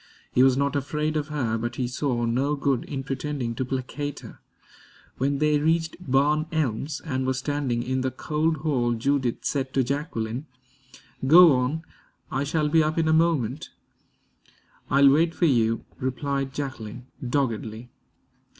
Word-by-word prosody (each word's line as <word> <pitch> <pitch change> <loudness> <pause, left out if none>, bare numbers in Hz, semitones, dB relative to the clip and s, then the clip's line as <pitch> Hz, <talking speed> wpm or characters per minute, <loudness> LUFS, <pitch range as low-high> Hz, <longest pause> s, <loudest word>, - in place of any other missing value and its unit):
He 125 - +3
was 130 0 +5
not 140 +1 0
afraid 150 +2 -1
of 150 -1 -1
her, 120 -7 -1
but 120 +1 -3
he 125 -1 -1
saw 125 -1 -1
no 130 +6 +1
good 140 -3 0
in 135 -2 -4
pretending 135 -3 -3
to 125 - -2
placate 135 +3 -4
her. - - -12 0.8
When 140 +2 +1
they 150 0 +2
reached 160 +2 +1
Barn 150 0 +2
Elms 145 -1 -1
and 130 -4 -1
were 130 - +1
standing 130 -3 -1
in 130 +1 -1
the 130 - 0
cold 155 +5 -1
hall, 125 -6 +1
Judith 130 +1 -1
said 130 -2 -2
to 135 - +3
Jacqueline: 130 -2 -3 0.8
"Go 170 +3 +9
on. 130 +5 0 0.5
I 135 +1 0
shall 150 +1 0
be 160 +2 +4
up 155 +1 0
in 165 -1 +2
a 160 - +4
moment." 155 -5 +1 1.2
"I'll 140 0 +6
wait 165 +3 +2
for 175 - +2
you," 115 -6 +2
replied 135 +1 -2
Jacqueline, 125 -4 -6 0.2
doggedly. 120 -3 -2
140 Hz, 155 wpm, -25 LUFS, 125-150 Hz, 1.2 s, Go